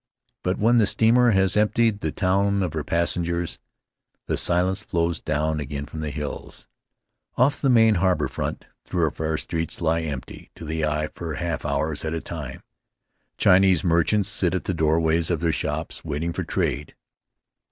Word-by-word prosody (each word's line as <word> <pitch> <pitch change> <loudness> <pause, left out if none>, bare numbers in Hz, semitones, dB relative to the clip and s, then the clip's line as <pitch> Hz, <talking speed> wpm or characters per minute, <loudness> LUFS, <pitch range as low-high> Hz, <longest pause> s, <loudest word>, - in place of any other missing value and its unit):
But 90 +1 -1
when 115 +3 +3
the 110 -4 +4
steamer 115 +3 +4
has 95 -4 +3
emptied 105 0 +2
the 80 - -2
town 100 +2 +1
of 90 - -3
her 80 -2 -2
passengers, 85 +1 -1 0.7
the - - -1
silence 90 +2 +2
flows 85 -1 -1
down 75 0 -1
again 70 0 -4
from 80 +2 -8
the 75 -1 -3
hills. 75 0 -6 0.7
Off 135 +3 +2
the 135 - +2
main 115 -3 +6
harbor 95 -1 +2
front - - -4 0.2
thoroughfare 80 -2 -1
streets 80 0 -4
lie 85 0 +1
empty 75 -5 -7
to 85 - -9
the 80 0 -2
eye 75 0 -1
for 80 -3 -5
half 85 -1 -3
hours 80 0 -1
at 80 +1 -2
a - - -2
time. - - -7 0.7
Chinese 95 -2 +4
merchants 90 +4 +2
sit 95 -4 +1
at 95 - -2
the 95 - -2
doorways 80 0 +1
of 85 -3 0
their 85 0 +1
shops, 75 - -3
waiting 80 +2 -3
for - - -3
trade. 70 +1 -2
85 Hz, 165 wpm, -24 LUFS, 80-95 Hz, 0.7 s, main